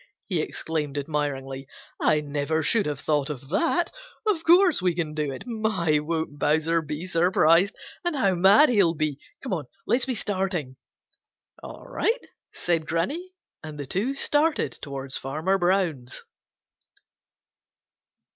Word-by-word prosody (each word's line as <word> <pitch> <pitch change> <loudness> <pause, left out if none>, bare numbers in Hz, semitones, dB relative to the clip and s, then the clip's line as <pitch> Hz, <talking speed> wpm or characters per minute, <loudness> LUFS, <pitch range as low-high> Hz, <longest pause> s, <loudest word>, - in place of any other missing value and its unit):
he 180 -6 0
exclaimed 150 -3 -3
admiringly. 140 -2 -3 0.3
"I 150 0 +3
never 150 +2 -1
should 210 +4 +2
have 145 -2 -3
thought 145 -2 0
of 135 -2 -7
that. 335 - +1 0.3
Of 390 -7 +1
course 350 - +5
we 180 -2 +1
can 160 -3 -2
do 150 -2 -2
it. 135 - -8
My, 215 -10 +1
won't 160 -1 -3
Bowser 160 +2 +2
be 155 +2 -5
surprised! 175 +1 +3 0.3
And 345 -3 -1
how 200 -8 +2
mad 195 - +6
he'll 195 -8 +3
be! 150 -2 -1 0.2
Come 260 - -3
on, 160 -6 -2 0.2
let's 245 +1 +2
be 255 - -1
starting!" 185 - -2 0.9
"All - - -10
right," - - -1 0.3
said 165 -3 -1
Granny, 290 - -2 0.3
and 155 -2 -8
the 145 - -4
two 210 - -1
started 300 +3 +1
towards 135 -1 -4
Farmer 160 +9 -1
Brown's. 175 -9 0
165 Hz, 135 wpm, -25 LUFS, 150-205 Hz, 0.9 s, mad